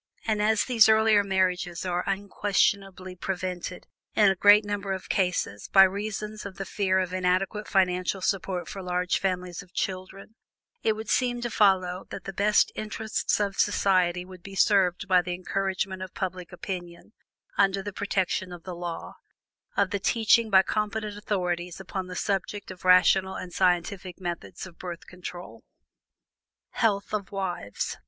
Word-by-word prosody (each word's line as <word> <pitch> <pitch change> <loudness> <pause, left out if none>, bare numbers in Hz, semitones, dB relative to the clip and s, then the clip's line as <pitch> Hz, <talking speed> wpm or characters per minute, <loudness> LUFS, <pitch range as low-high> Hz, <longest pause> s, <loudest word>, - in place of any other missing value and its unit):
And 215 -2 +1
as 215 0 +3
these 230 -4 +5
earlier 220 -1 +5
marriages 185 -2 0
are 180 0 -1
unquestionably 195 -1 0
prevented 180 -1 -4 0.3
in 205 -2 +6
a - - -1
great 205 +3 +6
number 205 -1 -2
of 190 - -7
cases 180 - -1
by 195 - +9
reasons 210 +2 -2
of 200 -2 -7
the 195 - -4
fear 190 -1 0
of 185 -1 -1
inadequate 185 +3 0
financial 185 0 +1
support 185 -1 -1
for 195 - -6
large 180 0 0
families 180 -2 -2
of 185 -1 -19
children, 190 +2 -4 0.5
it 220 - +2
would 220 0 -7
seem 245 -1 +1
to 240 -1 -3
follow 185 -3 +2
that - - -7
the 195 - -6
best 205 +2 +3
interests 215 0 -2
of 200 -1 -1
society 180 -3 +2
would 185 -1 -12
be 195 +2 -10
served 195 -1 +3
by 185 -2 +5
the 180 0 -4
encouragement 190 +1 -2
by 185 - -4
public 180 -1 -4
opinion, 180 +1 -7 0.4
under 195 -1 +2
the 205 0 -6
protection 190 -2 -1
of 175 -1 -9
the 185 - -6
law, 170 -1 -6 0.6
of 200 -2 +2
the 200 - -1
teaching 225 +2 +3
by 190 -2 +6
competent 210 +1 -2
authorities 180 -4 -2
upon 190 0 -5
the 180 - -7
subject 200 +1 -2
of 185 - -12
rational 190 +1 +5
and 180 -1 -7
scientific 180 0 0
methods 175 -1 -5
of 175 -3 -14
Birth 175 -2 -7
Control. 180 0 -9 1.1
HEALTH 205 -3 0
OF 205 -2 -3
WIVES. 180 - -3
190 Hz, 160 wpm, -27 LUFS, 180-205 Hz, 1.1 s, by